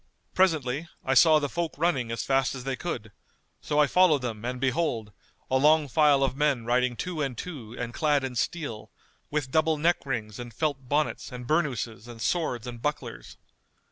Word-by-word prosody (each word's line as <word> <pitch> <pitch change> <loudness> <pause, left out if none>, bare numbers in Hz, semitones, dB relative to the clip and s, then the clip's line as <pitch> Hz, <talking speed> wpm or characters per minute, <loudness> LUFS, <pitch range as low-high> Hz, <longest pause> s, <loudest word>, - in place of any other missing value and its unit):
Presently, 160 -5 +1 0.2
I 130 - +2
saw 155 +3 +7
the 145 -1 0
folk 170 +2 -3
running 140 -8 +1
as 115 - -2
fast 135 0 +1
as 130 - -7
they 135 0 -2
could; 110 -9 -5 0.5
so 150 - -2
I 150 - +6
followed 155 -2 +4
them 110 -3 -4
and 125 +1 -3
behold, 130 -5 0 0.4
a 130 - +4
long 150 +1 +5
file 145 0 +4
of 130 -1 0
men 140 -5 +1
riding 125 +1 +1
two 175 +3 -4
and 135 -4 -2
two 125 -10 -7
and 120 0 -4
clad 145 -1 +2
in 130 -1 -4
steel, 120 -4 -3 0.4
with 145 -3 -2
double 160 +1 +2
neck 170 +3 +2
rings 115 -6 -4
and 120 -1 -7
felt 140 -5 -2
bonnets 150 0 0
and 125 -1 -7
burnouses 125 -7 -1
and 120 -1 -10
swords 125 -4 -1
and 120 -2 -7
bucklers. 150 +2 -4
135 Hz, 185 wpm, -27 LUFS, 120-155 Hz, 0.5 s, saw